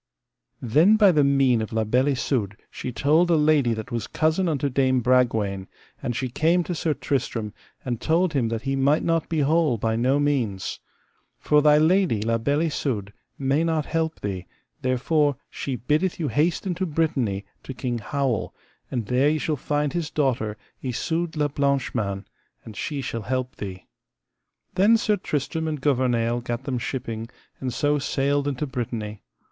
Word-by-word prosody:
Then 155 - +5
by 205 -3 +6
the 150 -4 +3
mean 135 -4 +3
of 110 - -4
La 110 0 +1
Beale 125 +5 +2
Isoud 120 -7 -1
she 125 - -5
told 150 +9 +3
a 170 - +5
lady 150 -6 +3
that 110 +3 -7
was 115 -3 -3
cousin 160 +3 +1
unto 145 -2 0
Dame 130 -1 +2
Bragwaine, 110 -6 +1 0.3
and 120 - -2
she 130 - -1
came 165 +8 +2
to 175 - -3
Sir 160 -2 -1
Tristram, 115 -6 -2 0.3
and 120 -3 -3
told 165 +1 +2
him 130 -5 +1
that 115 0 -3
he 135 0 -1
might 140 +3 +2
not 165 -1 0
be 160 -2 +1
whole 150 -3 +2
by 110 +1 0
no 130 +5 +2
means. 125 -10 -1 0.6
For 150 0 +3
thy 150 0 +6
lady, 165 - +3
La 115 +1 +1
Beale 140 +6 +1
Isoud, 120 -10 -2 0.2
may 140 +3 +1
not 160 -3 0
help 160 0 -2
thee, 95 -3 -4 0.3
therefore 140 +3 +1 0.2
she 135 - -3
biddeth 155 +10 0
you 155 -4 -1
haste 160 +6 +1
into 185 0 -1
Brittany 135 -11 0 0.2
to - - -8
King 125 -2 -3
Howel, 130 0 -2 0.3
and 120 -4 -2
there 125 +6 +3
ye 155 - +1
shall 155 0 -1
find 145 +1 -1
his 170 -4 -2
daughter, 120 -7 0 0.2
Isoud 160 +7 -2
la 150 -1 +2
Blanche 140 -2 0
Mains, 100 -4 -2 0.4
and 110 - -10
she 140 +6 -3
shall 115 -3 -4
help 130 +4 -3
thee. 95 -2 -7 0.9
Then 210 +5 +5
Sir 215 -2 +1
Tristram 160 -1 -2
and 155 -2 -2
Gouvernail 120 -4 +1
gat 120 +1 -4
them 130 -2 -2
shipping, 115 -2 -4 0.3
and 130 -1 -3
so 145 +3 +1
sailed 140 0 0
into 145 +1 -1
Brittany. 115 -5 -4
135 Hz, 175 wpm, -24 LUFS, 120-155 Hz, 0.9 s, by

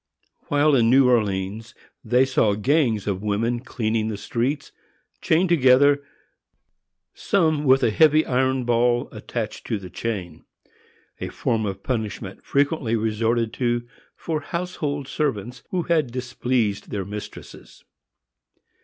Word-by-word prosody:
While 145 +1 +3
in 115 -3 +4
New 130 +1 +5
Orleans 105 -2 0 0.3
they 125 +3 +3
saw 115 -6 +2
gangs 115 -2 +1
of 100 -2 -2
women 110 +3 0
cleaning 110 -3 -2
the 110 -2 -3
streets, 130 +7 -2 0.5
chained 170 +3 +2
together, 140 -2 +5 1.1
some 160 -7 +1
with 135 0 +5
a 110 - +3
heavy 155 +5 +4
iron 130 0 +1
ball 120 0 +1
attached - - -5
to 110 - -1
the 95 -2 -10
chain; 95 -8 -5 0.8
a - - -4
form 110 -2 -1
of 95 0 -6
punishment 110 -6 -4
frequently 140 -4 0
resorted 115 +1 0
to 120 -1 -1 0.3
for 155 -2 -3
household 150 -4 -4
servants 125 -5 -3
who 180 -2 -1
had 155 -7 +1
displeased 120 -4 -2
their 100 -2 -3
mistresses. 105 +1 -10
120 Hz, 125 wpm, -23 LUFS, 110-140 Hz, 1.1 s, New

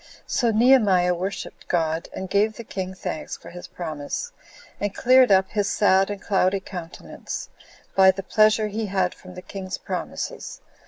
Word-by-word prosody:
So 240 - +1
Nehemiah 215 -6 +4
worshipped 185 +3 -5
God, 165 -1 -1
and 190 - -5
gave 205 +3 +1
the 235 - -8
king 190 -3 -5
thanks 160 - -5
for 170 - -12
his 175 0 -9
promise, 155 - -5 0.5
and 205 -1 -2
cleared 255 -1 +5
up 190 0 +4
his 205 -2 0
sad 195 -1 +3
and 205 -1 -4
cloudy 195 -1 +1
countenance, 180 -3 -7 0.5
by 190 -1 +7
the 190 +1 0
pleasure 215 +2 +3
he 215 +1 -3
had 190 -2 0
from 185 - -14
the 180 - -9
king's 190 -2 -6
promises. - - -5
195 Hz, 160 wpm, -24 LUFS, 180-210 Hz, 0.5 s, by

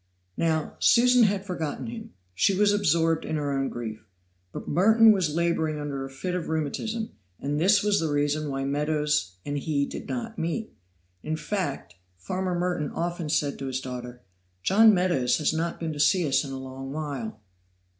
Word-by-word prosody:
Now, 160 -2 0
Susan 245 0 +5
had 200 -1 0
forgotten 165 -6 -4
him; 230 -1 -8 0.2
she 185 - +2
was 205 0 +4
absorbed 165 -4 +2
in - - -3
her 145 -2 -1
own 135 -1 0
grief; 110 -2 -6 0.5
but - - -7
Merton 220 +7 +6
was 180 -7 +1
laboring 160 -2 0
under 140 -2 -4
a 135 - -6
fit 155 +7 -4
of 180 -2 -2
rheumatism, 215 +9 -2 0.3
and 145 +2 -2
this 200 +3 +4
was 210 -1 +3
the 160 - -1
reason 145 +1 0
why 135 0 -2
Meadows 150 -8 0
and 145 0 -2
he 140 -1 0
did - - -8
not 230 -3 -4
meet. 170 +7 -3 0.5
In 155 - -2
fact, 150 - -3 0.2
farmer 180 - -2
Merton 175 -5 -1
often 170 -2 -3
said 145 -2 0
to 135 - -4
his 130 0 -2
daughter, 125 -1 -7 0.4
"John 220 +3 +6
Meadows 180 -10 +2
has 155 - +1
not 165 +1 -2
been 160 -2 -3
to 145 - -7
see 175 +2 +3
us 135 +1 +2
a - - -6
long 135 0 -7
while." 140 -8 -5
155 Hz, 175 wpm, -26 LUFS, 140-185 Hz, 0.5 s, Merton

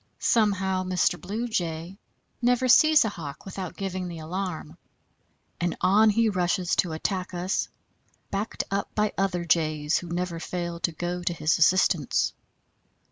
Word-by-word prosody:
Somehow 195 -4 +1
Mr. 180 -1 +1
Blue 215 +6 -3
Jay 175 -2 -3 0.4
never 250 +1 +2
sees 305 +2 +6
a - - +1
Hawk 155 -7 -8
without 190 -2 -6
giving 185 -2 -3
the 170 -1 -7
alarm, 180 +2 -5 0.8
and 175 0 -1
on 205 +4 +5
he 230 +2 +3
rushes 180 -2 0
to 170 -3 +1
attack 185 +3 -3
us, 180 +2 -1 0.6
backed 200 +3 -2
up 200 0 -2
by 210 -1 +1
other 185 -3 -1
Jays 155 -2 +1
who 175 - -9
never 170 0 -3
fail 170 0 -4
to 170 - 0
go 175 +2 -4
to 175 0 -1
his 155 -1 +1
assistance. 175 -3 +3
180 Hz, 145 wpm, -26 LUFS, 170-195 Hz, 0.8 s, sees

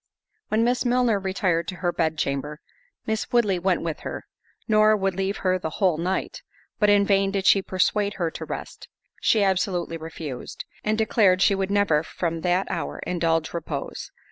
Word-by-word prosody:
When 220 +1 +1
Miss 245 +1 +1
Milner 245 -4 +2
retired 190 -3 0
to 185 - -4
her 175 -1 -1
bed 160 -1 0
chamber, 145 +1 -2 0.5
Miss 220 0 -2
Woodley 210 -7 +2
went 180 0 +1
with 165 -2 -3
her, - - -6 0.4
nor 215 -1 +5
would 195 -1 0
leave 195 +2 -2
her 185 0 +2
the 160 - -3
whole 180 -6 +2
night—but 190 +3 -3
in 205 -1 +5
vain 195 -1 +3
did 195 -1 -2
she 195 +1 +6
persuade 200 +2 0
her 170 -3 -1
to - - -7
rest—she 215 -3 -3
absolutely 185 -3 0
refused; 160 -4 -7 0.2
and 215 0 0
declared 205 -4 +3
she - - +4
would 195 0 -1
never, 200 -7 +3
from 165 0 -3
that 180 +2 +1
hour, 70 +1 -3
indulge 165 -2 0
repose. 155 -4 -5
190 Hz, 170 wpm, -24 LUFS, 165-205 Hz, 0.5 s, she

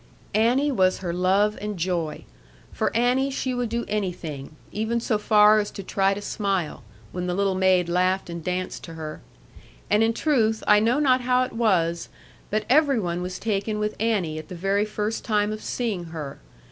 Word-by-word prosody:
Annie 250 +7 +3
was 185 -7 +2
her 175 -3 -4
love 195 +4 +2
and 210 -1 -4
joy. 170 -3 -2 0.5
For - - 0
Annie 250 +3 +2
she 265 -1 -2
would 245 -2 -2
do 235 +1 -2
anything, 175 -8 -4 0.2
even 220 +2 -1
so 225 -2 0
far 210 0 +5
as 205 - -2
to 195 - -8
try 195 +1 +1
to 205 - -6
smile, 195 -7 -2 0.3
when 180 0 -4
the 180 - -1
little 195 0 +1
maid 185 -2 +3
laughed 185 +2 +1
and 170 -1 -6
danced 180 +1 -3
to 165 - -10
her. 155 -1 -7 0.7
And 210 - +4
in 225 0 +3
truth 225 -8 +1
I 210 0 +6
know 235 +6 +2
not 260 -3 +3
how 250 0 +2
it 255 - -5
was, 175 -7 +1 0.4
but 215 0 -1
every 280 -1 +4
one 175 -3 -2
was 180 0 -4
taken 210 0 -1
with 210 0 -2
Annie 195 -9 0
at 155 - -10
the 185 - -8
very 195 +4 +1
first 215 +1 -3
time 210 -1 +1
of 215 0 -5
seeing 215 -8 -3
her. 155 -4 -7
205 Hz, 190 wpm, -24 LUFS, 180-225 Hz, 0.7 s, I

